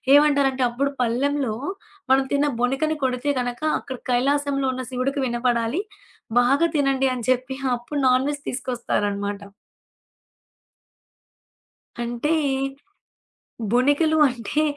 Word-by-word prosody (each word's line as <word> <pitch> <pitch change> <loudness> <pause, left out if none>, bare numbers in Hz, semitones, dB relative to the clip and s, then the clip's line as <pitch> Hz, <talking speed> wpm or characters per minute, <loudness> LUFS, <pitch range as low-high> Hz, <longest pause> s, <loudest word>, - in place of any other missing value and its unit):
ఏమంటారంటే 280 -3 +4
అప్పుడు 275 +4 -1
పల్లెంలో 255 +1 0 0.6
మనం 270 0 +5
తిన్న 285 +1 +3 0.2
బొనికని 270 +5 +1
కొడితే 255 +2 0
గనక 245 +1 -3 0.2
అక్కడ 260 -2 -7
కైలాసంలో 275 +2 +1
ఉన్న 255 0 -4
శివుడికి 265 +3 -1
వినపడాలి. 240 +4 0 0.6
బాగా 275 +7 +3
తినండి 270 -2 +2
అని 240 -3 -5
చెప్పి 255 +1 -1 0.2
అప్పుడు 265 +5 -5
నాన్‌వెజ్ 270 +3 +2
తీసుకొస్తారనమాట. 205 -5 -2 2.6
అంటే! 240 +6 -1 1.4
బొనికలు 290 +6 +3
అంటే 245 +5 -2
260 Hz, 95 wpm, -23 LUFS, 245-285 Hz, 2.6 s, మనం